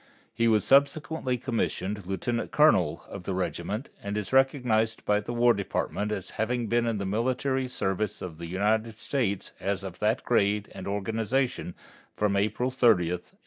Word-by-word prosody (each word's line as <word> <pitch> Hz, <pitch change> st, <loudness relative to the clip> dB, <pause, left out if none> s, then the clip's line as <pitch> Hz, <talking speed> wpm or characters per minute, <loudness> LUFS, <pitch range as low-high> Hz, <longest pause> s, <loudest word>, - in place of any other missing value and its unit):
He 115 Hz, +1 st, +2 dB
was 110 Hz, -3 st, +4 dB
subsequently 140 Hz, -1 st, +2 dB
commissioned 105 Hz, -5 st, -2 dB
lieutenant 115 Hz, +5 st, -2 dB
colonel 95 Hz, -, +3 dB
of 100 Hz, -, -7 dB
the 90 Hz, +1 st, -3 dB
regiment 95 Hz, -, -3 dB
and 100 Hz, +1 st, -3 dB
is 105 Hz, +2 st, -4 dB
recognized 125 Hz, -5 st, +2 dB
by 105 Hz, 0 st, +3 dB
the 105 Hz, -, -6 dB
War 120 Hz, 0 st, +4 dB
Department 105 Hz, +1 st, -2 dB
as 100 Hz, -2 st, -4 dB
having 120 Hz, +1 st, 0 dB
been 120 Hz, +1 st, +1 dB
in 115 Hz, -2 st, 0 dB
the 100 Hz, -, -3 dB
military 130 Hz, +5 st, 0 dB
service 95 Hz, -4 st, -1 dB
of 85 Hz, -3 st, -7 dB
the 85 Hz, -, -6 dB
United 110 Hz, +5 st, 0 dB
States 110 Hz, -5 st, -2 dB
as 100 Hz, 0 st, -2 dB
of 95 Hz, -2 st, -7 dB
that 110 Hz, +3 st, +1 dB
grade 105 Hz, -3 st, +1 dB
and -, -, -7 dB
organization 110 Hz, +1 st, -1 dB, 0.4 s
from 105 Hz, -1 st, +1 dB
April 110 Hz, +6 st, 0 dB
30, 130 Hz, -1 st, +3 dB, 0.2 s
1862. 90 Hz, 0 st, -6 dB
110 Hz, 165 wpm, -27 LUFS, 100-125 Hz, 0.4 s, was